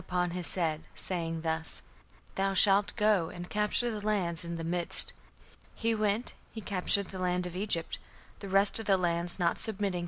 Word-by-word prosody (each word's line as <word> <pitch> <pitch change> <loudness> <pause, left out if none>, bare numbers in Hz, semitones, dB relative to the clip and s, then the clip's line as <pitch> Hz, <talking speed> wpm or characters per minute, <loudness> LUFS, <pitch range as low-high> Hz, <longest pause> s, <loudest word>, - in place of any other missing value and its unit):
upon 180 -1 -1
his 180 -1 -1
head, 160 -4 -1
(saying) 165 -3 -3
thus: 160 0 -4 0.5
'Thou 195 0 -1
shalt 195 0 +5
go 210 -6 +2
and 175 0 -9
capture 210 +3 +1
the 210 -2 -6
lands 180 -6 -1
in 170 0 -5
the 165 - -5
midst'. 170 +1 +1 0.6
(He 230 0 0
we)nt, 215 +2 -1 0.2
he 225 - -7
captured 200 -1 0
the 190 - -7
land 180 0 0
of 180 -1 -7
Egypt. 185 -4 -1 0.4
The 200 - -8
rest 195 +3 +4
of 220 - -7
the 195 -2 +4
lands 170 -1 +1
not 175 -3 0
submitting 200 -4 +1
185 Hz, 180 wpm, -30 LUFS, 170-205 Hz, 0.6 s, shalt